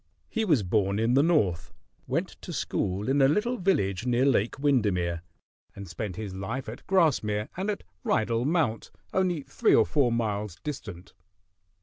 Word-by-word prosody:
He 225 Hz, -1 st, -1 dB
was 150 Hz, -, +3 dB
born 100 Hz, +1 st, +1 dB
in 115 Hz, +3 st, +2 dB
the 135 Hz, -, +5 dB
North, 105 Hz, -, +1 dB, 0.4 s
went -, -, -1 dB
to -, -, -7 dB
school 95 Hz, +3 st, -2 dB
in 135 Hz, +2 st, +2 dB
a 135 Hz, -, +6 dB
little 220 Hz, -, +1 dB
village 110 Hz, -, +1 dB
near 125 Hz, +1 st, +2 dB
Lake 120 Hz, -5 st, +2 dB
Windermere, 100 Hz, -, +1 dB, 0.5 s
and 100 Hz, 0 st, -8 dB
spent 90 Hz, +2 st, -5 dB
his 100 Hz, -1 st, -6 dB
life 110 Hz, +7 st, -4 dB
at 110 Hz, +3 st, -9 dB
Grasmere 120 Hz, -, +2 dB
and 190 Hz, +3 st, -2 dB
at 205 Hz, -, -3 dB, 0.2 s
Rydal 115 Hz, +1 st, +1 dB
Mount 145 Hz, -8 st, 0 dB, 0.2 s
only 180 Hz, -5 st, +1 dB
three -, -, +2 dB
or -, -, +5 dB
four 120 Hz, -, +2 dB
miles 105 Hz, -5 st, -2 dB
distant. 105 Hz, -, -7 dB
115 Hz, 160 wpm, -27 LUFS, 100-150 Hz, 0.5 s, a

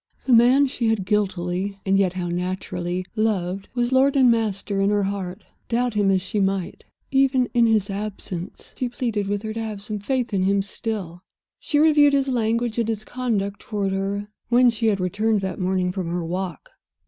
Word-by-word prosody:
The 260 Hz, -, +3 dB
man 250 Hz, +4 st, +6 dB
she 245 Hz, -3 st, -2 dB
had 220 Hz, -4 st, +1 dB
guiltily 195 Hz, -1 st, -1 dB
(and 195 Hz, 0 st, +2 dB
yet 195 Hz, -2 st, +2 dB
how 180 Hz, -1 st, -3 dB
naturally) 180 Hz, 0 st, -3 dB
loved 195 Hz, -3 st, -1 dB
was 240 Hz, 0 st, +1 dB
lord 270 Hz, +2 st, +4 dB
and 260 Hz, -3 st, +6 dB
master 205 Hz, -3 st, -1 dB
in 195 Hz, -, +3 dB
her 205 Hz, -1 st, +2 dB
heart, 190 Hz, -2 st, -4 dB, 0.3 s
doubt 245 Hz, 0 st, +1 dB
him 205 Hz, -2 st, +2 dB
as 190 Hz, -1 st, +2 dB
she 210 Hz, +2 st, -2 dB
might. 195 Hz, -2 st, -1 dB, 0.3 s
Even 265 Hz, -2 st, +3 dB
in 235 Hz, -2 st, +4 dB
his 215 Hz, -3 st, +2 dB
absence 195 Hz, -3 st, -6 dB
he 255 Hz, -, -2 dB
pleaded 230 Hz, -5 st, -2 dB
with 205 Hz, +1 st, -2 dB
her 220 Hz, 0 st, -4 dB
to 225 Hz, -, -4 dB
have 215 Hz, -2 st, -5 dB
some 210 Hz, +1 st, -5 dB
faith 245 Hz, +1 st, -2 dB
in 190 Hz, -, +1 dB
him 195 Hz, +1 st, +2 dB
still. 195 Hz, -4 st, -5 dB, 0.4 s
She 295 Hz, -, -1 dB
reviewed 295 Hz, -2 st, +5 dB
his 275 Hz, -1 st, +2 dB
language 230 Hz, -1 st, 0 dB
and 230 Hz, -1 st, 0 dB
his 215 Hz, -1 st, -2 dB
conduct 210 Hz, -6 st, -2 dB
toward 200 Hz, -3 st, -2 dB
her, 200 Hz, +1 st, -2 dB, 0.2 s
when 245 Hz, 0 st, +5 dB
she 225 Hz, 0 st, -1 dB
had 205 Hz, -3 st, +2 dB
returned 205 Hz, +4 st, 0 dB
that 190 Hz, -1 st, -4 dB
morning 185 Hz, -1 st, 0 dB
from 185 Hz, -2 st, -4 dB
her 170 Hz, 0 st, -2 dB
walk. 180 Hz, -2 st, -5 dB
205 Hz, 195 wpm, -23 LUFS, 190-235 Hz, 0.4 s, man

